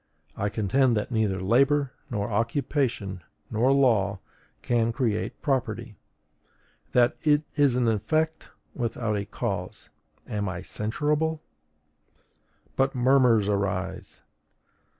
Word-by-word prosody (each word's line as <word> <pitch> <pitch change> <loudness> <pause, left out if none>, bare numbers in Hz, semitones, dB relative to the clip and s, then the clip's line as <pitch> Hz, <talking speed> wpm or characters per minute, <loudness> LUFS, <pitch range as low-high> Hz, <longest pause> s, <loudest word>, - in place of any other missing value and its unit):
I 100 - -1
contend 115 +4 +2
that 105 - -3
neither 110 -4 0
labor, 135 +7 +3 0.2
nor 105 -4 -2
occupation, 115 - -1 0.3
nor 115 +4 +3
law, 110 -8 +3 0.5
can 115 -1 +1
create 115 -4 -2
property; 125 -7 -1 1.0
that 120 -1 +3
it 150 -1 +3
is 145 -4 +3
an 125 -2 +2
effect 155 +9 0 0.2
without 115 -3 -2
a 100 -1 -2
cause: - - -5 0.4
am 105 -2 -2
I 95 0 -5
censurable? 150 +10 -1 1.3
But 135 +1 +1
murmurs 125 -4 +4
arise! 95 -2 -2
115 Hz, 105 wpm, -26 LUFS, 105-135 Hz, 1.3 s, murmurs